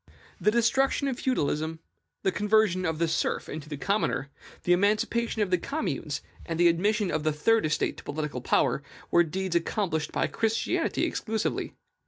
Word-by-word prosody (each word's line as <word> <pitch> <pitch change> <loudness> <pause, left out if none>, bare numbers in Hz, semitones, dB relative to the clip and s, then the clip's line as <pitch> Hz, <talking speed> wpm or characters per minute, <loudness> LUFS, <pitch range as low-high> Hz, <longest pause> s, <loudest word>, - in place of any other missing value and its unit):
The - - +3
destruction 250 +5 +2
of 265 -1 -2
feudalism, 160 - 0 0.5
the 190 - +2
conversion 205 -2 +2
of 160 -1 -1
the 170 +1 +1
serf 160 - -1
into 155 -1 -7
the 145 - -4
commoner, 145 -6 0 0.3
the 175 - +4
emancipation 215 +4 +1
of 190 - -4
the 180 - +3
communes, 310 +3 -3 0.2
and 165 0 -4
the 175 0 +7
admission 205 +4 +1
of 155 - 0
the 155 +1 +1
Third 215 +6 +2
Estate 155 - 0
to - - -10
political 145 -4 -4
power, 135 - +2 0.3
were 175 - +6
deeds 185 +2 -3
accomplished 170 -2 0
by - - +1
Christianity 225 0 0
exclusively. 220 -1 -2
185 Hz, 165 wpm, -28 LUFS, 160-220 Hz, 0.5 s, the